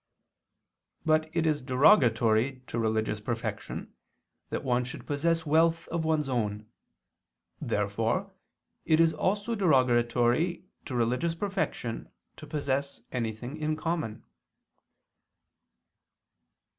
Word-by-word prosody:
But 155 0 +2
it 165 0 0
is 155 -2 +1
derogatory 125 - +3
to 115 - -4
religious 110 -1 0
perfection 110 -2 -4 0.6
that - - -3
one 125 -1 +1
should 125 - -8
possess 165 +3 0
wealth 165 +2 +3
of 170 -1 -1
one's 155 -2 +1
own. 105 -5 -2 1.0
Therefore 115 - -1 0.5
it 160 -1 +3
is 165 -1 +5
also 205 +8 0
derogatory 130 - +2 0.2
to 130 - -5
religious 125 +8 0
perfection 185 - -3 0.3
to - - -10
possess 140 -1 -2
anything 120 +3 -4
in 155 0 -1
common. 155 -9 -3
135 Hz, 100 wpm, -29 LUFS, 120-160 Hz, 1.0 s, is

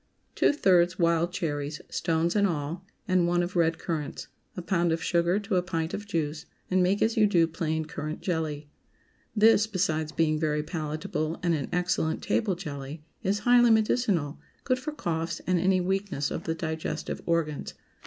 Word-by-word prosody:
✠ - - -43
Two - - +4
thirds 185 - +3
wild 170 0 +2
cherries 150 -4 -3
(stones 165 +1 0
and 200 -1 +4
all) 165 +2 -4 0.2
and 185 -2 +3
one 175 0 +2
of 175 +1 -5
red 165 -1 +2
currants. 155 -4 -4 0.3
A - - -2
pound 170 -1 +1
of 160 0 -1
sugar 170 +1 +2
to 205 -2 -1
a - - +3
pint 165 -2 -3
of 205 0 -5
juice, 160 -5 -2 0.2
and 185 0 +3
make 190 +3 +2
as 225 +1 +1
you 215 -1 +5
do 175 -5 +4
plain 160 -1 -2
currant 155 +1 -5
jelly. 155 -4 -2 0.7
This, 215 0 +5
besides 160 -6 -1
being 155 -1 +1
very 150 -1 0
palatable 155 +1 -3
and 170 -1 +2
an 145 -4 -2
excellent 180 -2 0
table 205 -5 +1
jelly, 150 -3 -7 0.2
is 195 +2 +1
highly 245 -1 +6
medicinal, 215 - +2 0.2
good 255 -1 +1
for 280 +4 -4
coughs 165 - -3
and 180 -1 +2
any 185 +1 +3
weakness 185 -5 -1
of 165 - -4
the 160 - -1
digestive 160 -1 -4
organs. 165 -3 -1
170 Hz, 175 wpm, -27 LUFS, 160-190 Hz, 0.7 s, highly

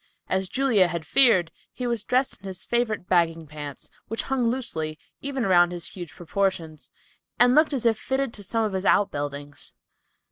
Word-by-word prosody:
As 190 0 0
Julia 245 -9 +3
had 170 -2 -4
feared, 185 -11 +4 0.2
he 250 - -5
was 235 -3 -1
dressed 255 +3 0
in 195 - -9
his 185 -2 -7
favorite 225 -6 -1
bagging 165 -2 +2
pants, 145 -2 -8 0.2
which 225 - -2
hung 265 -3 0
loosely, 160 -11 -3 0.2
even 275 -3 -2
around 175 -2 +5
his 175 -1 -1
huge 175 -4 -8
proportions, 175 -4 -2 0.5
and 245 0 +5
looked 310 +3 +5
as 265 -4 -2
if 225 -2 +3
fitted 265 -2 -1
to 205 - -7
some 225 +3 0
of 210 - -3
his 190 0 -2
outbuildings. 145 -7 -1
195 Hz, 175 wpm, -25 LUFS, 165-240 Hz, 0.5 s, around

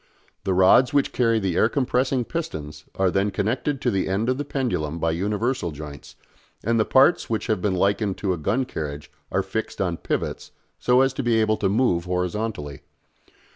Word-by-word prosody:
The 95 -2 +1
rods 110 +9 +5
which 140 - +2
carry 115 -2 +2
the 95 -5 -1
air 110 - +4
compressing 130 -1 0
pistons 80 - -5
are 95 -1 +2
then 100 +2 +1
connected 120 +8 -1
to 125 - +1
the 95 -2 0
end 105 +5 0
of 130 +2 0
the - - -1
pendulum 120 - -2
by 80 0 0
universal 105 +4 -1
joints, 75 -2 -9 0.5
and 115 0 +1
the 110 - +3
parts 135 +6 +4
which 110 -1 -1
have 110 -5 0
been 100 -2 0
likened 100 +1 +1
to 95 -3 0
a - - -3
gun 110 - 0
carriage 75 -7 -6 0.2
are - - +1
fixed - - -4
on - - 0
pivots - - -3 0.3
so 125 +1 +4
as 135 0 +2
to 135 - -3
be 120 -3 +2
able 110 0 +2
to - - 0
move 100 -6 +1
horizontally. 90 -5 -3
105 Hz, 190 wpm, -24 LUFS, 90-125 Hz, 0.5 s, rods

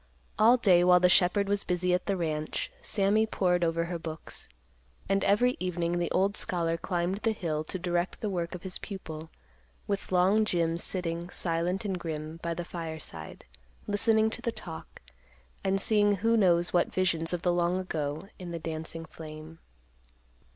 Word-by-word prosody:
All 235 +4 +7
day, 185 -7 +5
while 180 0 +6
the 180 0 +5
shepherd 195 +3 +4
was 200 0 +1
busy 180 0 0
at 180 - 0
the 200 -2 +1
ranch, 155 - -2
Sammy 210 - +2
pored 180 -4 +1
over 165 0 +1
her 170 0 -4
books; 160 -1 -6 0.6
and 195 0 +1
every 245 +6 +3
evening 175 -1 -1
the 175 - 0
old 195 +2 +1
scholar 165 -2 0
climbed 175 +2 -1
the 225 0 +1
hill 155 -6 -2
to 185 - -4
direct 175 0 -1
the 215 - -2
work 175 -3 -2
of 175 - -9
his 185 -1 -3
pupil, 160 -6 -7 0.6
with 200 -1 -3
long 190 +4 +4
Jim 170 -4 0
sitting, 170 -1 -2
silent 175 +3 -1
and 190 -3 -2
grim, 155 -1 -5
by 170 0 -2
the 175 +1 -4
fireside, 160 - -7 0.4
listening 220 +1 +2
to - - -4
the 235 - -1
talk, 170 - -9 0.6
and 195 0 +1
seeing 205 0 +4
who 225 +4 +2
knows 175 -5 +4
what 175 -1 +2
visions 170 -3 0
of 175 -1 -2
the 175 - +3
long 175 +1 +1
ago 155 -2 -3
in 180 -2 -7
the 170 - -4
dancing 165 0 -5
flame. 155 0 -10
180 Hz, 170 wpm, -29 LUFS, 165-195 Hz, 0.6 s, All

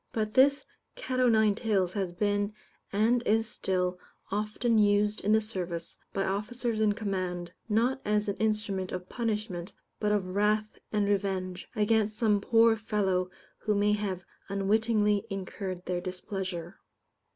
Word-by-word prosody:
But 215 -1 -2
this 280 +2 +5 0.3
cat 260 - -3
o' 250 -1 +5
nine 220 -2 +4
tails 200 -5 0
has 195 -4 -1
been, 205 +2 0 0.4
and 225 +4 +3
is 225 -1 +2
still, 180 -3 -1 0.3
often 215 +3 +1
used 205 0 +3
in 205 - +2
the 220 0 +5
service, 180 -6 -4 0.2
by 195 - -1
officers 220 +4 -2
in 210 -1 +4
command, 185 -5 -3 0.2
not 240 +5 +2
as 210 0 +1
an 200 - -1
instrument 210 -4 -1
of 180 0 -5
punishment, 210 -6 -3 0.3
but 210 -1 +1
of 200 -3 0
wrath 215 +1 +1
and 210 -1 +1
revenge, 190 -2 -1
against 215 0 +2
some 210 -3 +3
poor 225 +1 +5
fellow 195 -4 0 0.3
who 210 -1 0
may 205 +1 +3
have 195 -4 -2 0.2
unwittingly 210 +1 +2
incurred 190 -2 -5
their 175 -1 -1
displeasure. 185 -1 -5
210 Hz, 145 wpm, -29 LUFS, 190-220 Hz, 0.4 s, this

